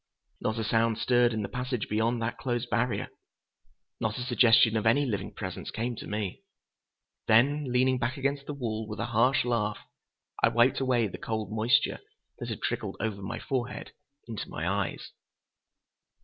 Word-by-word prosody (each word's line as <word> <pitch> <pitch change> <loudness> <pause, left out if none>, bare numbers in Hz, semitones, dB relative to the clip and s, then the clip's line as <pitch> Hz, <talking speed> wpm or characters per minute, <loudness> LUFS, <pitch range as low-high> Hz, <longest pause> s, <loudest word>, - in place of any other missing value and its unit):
Not 110 - -1
a 110 - -1
sound 115 +1 +2
stirred 120 +1 +3
in 110 -2 -2
the - - -2
passage 125 0 -3
beyond 115 +2 0
that 115 - -3
closed 120 -1 -2
barrier. 120 +1 0 0.9
Not 110 -1 -1
a 125 - -3
suggestion 120 -2 +5
of 110 0 +1
any 140 +6 +4
living 100 -7 -2
presence - - -6
came 120 +2 -3
to - - -7
me. 105 -3 -3 0.9
Then, 135 +5 +4
leaning 130 +1 +3
back 120 +3 -1
against 140 +1 -1
the 145 - -4
wall 110 -5 -3
with 105 - -6
a - - 0
harsh 125 +4 +4
laugh, 105 -3 0 0.6
I - - +6
wiped 120 +2 +3
away 125 -3 +2
the 100 - -6
cold 110 -2 -3
moisture 110 +3 +2 0.4
that - - -5
had - - -5
trickled - - -2
over 105 -3 -2
my 100 +4 -4
forehead 130 -2 -3 0.4
into 115 -3 -5
my 80 +4 -3
eyes. 100 0 -2
115 Hz, 170 wpm, -29 LUFS, 110-125 Hz, 0.9 s, I